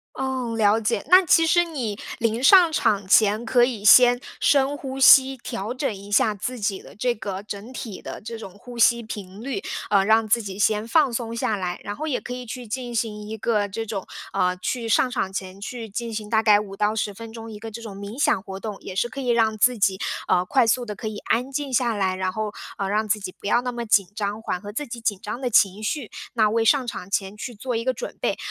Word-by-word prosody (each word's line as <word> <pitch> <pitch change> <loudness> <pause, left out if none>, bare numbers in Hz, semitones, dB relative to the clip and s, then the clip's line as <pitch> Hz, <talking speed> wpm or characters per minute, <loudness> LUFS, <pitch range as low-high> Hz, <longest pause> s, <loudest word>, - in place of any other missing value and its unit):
哦， 260 -3 -2
了 215 0 +3
解， 210 -2 -1
那 365 +3 +7
其 330 0 +4
实 345 +2 +4
你 255 -11 -4 0.2
临 230 +1 0
上 345 +3 +7
场 205 -9 +1
前， 210 +3 +4
可 240 +1 +4
以 235 -5 -3
先 245 +3 +7 0.2
深 280 0 +3
呼 270 -2 -6
吸， 270 0 +7
调 235 -3 -5
整 255 -3 -2
一 200 +1 -11
下 215 +1 +3
自 245 +5 -5
己 200 -3 -2
的 - - -15
这 245 +3 0
个 195 -3 -5
整 210 +3 -8
体 225 -6 -7
的 - - -7
这 230 +2 -7
种 220 -4 -9
呼 245 +3 -11
吸 235 0 +4
频 200 -3 -8
率， 250 -6 -4 0.3
呃， 200 -2 +3
让 220 +2 +3
自 230 +2 +2
己 195 -2 -7
先 210 +1 +1
放 280 +1 +3
松 230 -1 -3
下 225 -2 -1
来， 180 -2 -4
然 205 - -4
后 305 +8 -5
也 270 - -1
可 - - -7
以 250 0 -6
去 245 +1 -7
进 245 +2 -5
行 215 -2 -2
一 220 - -5
个 210 -2 0
这 225 +3 -5
种， 205 -3 -4 0.3
呃 180 0 +1
去 230 +5 -3
上 255 - +3
场 190 -4 -2
前 190 0 -6
去 230 +2 -6
进 230 +3 -5
行 215 -1 -5
大 220 0 +2
概 210 -2 +6
5 200 -2 -6
到 210 +1 +1
10 205 -1 -2
分 230 +2 -9
钟 225 0 -9
一 210 - -8
个 225 +1 -7
这 225 +2 -8
种 215 -4 -8
冥 200 +6 -7
想 195 - +2
活 190 -1 -7
动， 210 0 -6
也 185 - -8
是 240 - +1
可 260 +4 -7
以 255 - -4
让 225 -2 +2
自 245 +2 +3
己 195 -2 +2 0.3
呃 180 0 +2
快 255 +5 +3
速 245 +2 +2
地 210 -3 -6
可 220 - -7
以 215 -1 -4
安 250 +6 -1
静 280 -1 -3
下 240 -2 +2
来， 190 -2 0
然 185 0 -2
后 215 +1 -3 0.3
呃 195 -1 -2
让 215 +2 0
自 210 +1 +1
己 190 -2 -6
不 - - -10
要 240 - +3
那 250 0 -3
么 240 -1 -5
紧 200 -4 +3
张， 210 0 -3
缓 180 - -3
和 205 +1 -8
自 290 +5 -4
己 235 0 -7
紧 205 -4 -1
张 215 +4 -5
的 255 - -1
情 200 -2 +3
绪， 250 +1 -3 0.2
那 220 -3 +3
为 225 +1 +1
上 265 +3 +4
场 180 - -5
前 195 0 -2
去 240 +3 -6
做 240 +3 -3
一 230 - -2
个 260 0 0
准 - - -7
备。 - - 0
225 Hz, 265 characters per minute, -23 LUFS, 205-245 Hz, 0.3 s, 那